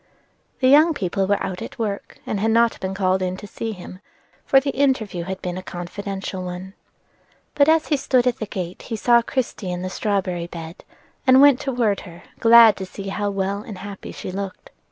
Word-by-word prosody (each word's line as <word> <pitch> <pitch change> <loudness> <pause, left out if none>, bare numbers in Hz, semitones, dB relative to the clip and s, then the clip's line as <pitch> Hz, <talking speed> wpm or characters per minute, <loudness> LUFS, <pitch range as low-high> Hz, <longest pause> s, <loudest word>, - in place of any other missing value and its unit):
The 255 - +4
young 305 +4 +6
people 190 -4 -1
were 205 0 +2
out 185 -1 -4
at - - -8
work, 205 -3 -4
and 205 - -2
had 220 +3 +1
not 230 +1 +3
been 190 0 -4
called 190 -1 +1
in 185 0 -2
to 205 - -9
see 225 +2 -5
him, 185 -2 -10 0.4
for 270 - +5
the 275 +1 -2
interview 235 -11 0
had 190 0 -6
been 180 0 -3
a - - -7
confidential 190 +2 -6
one. 180 +1 -7 0.8
But 285 +1 +4
as 320 0 +3
he 295 - +3
stood 255 -2 +2
at 250 -2 0
the 215 - -4
gate 180 -2 -5
he 230 - -5
saw 235 +2 +4
Christie 235 -5 -3
in 180 0 -4
the 185 - -4
strawberry 185 -5 -1
bed, 165 -1 -9 0.4
and 260 0 +7
went 280 -2 +7
toward 240 -7 0
her, 175 -3 -12 0.2
glad 230 -2 +7
to 190 - -5
see 195 +1 -7
how 205 +1 -2
well 195 0 -2
and 210 -2 -9
happy 200 +1 -8
she - - -7
looked. 195 0 -6
200 Hz, 205 wpm, -22 LUFS, 185-235 Hz, 0.8 s, and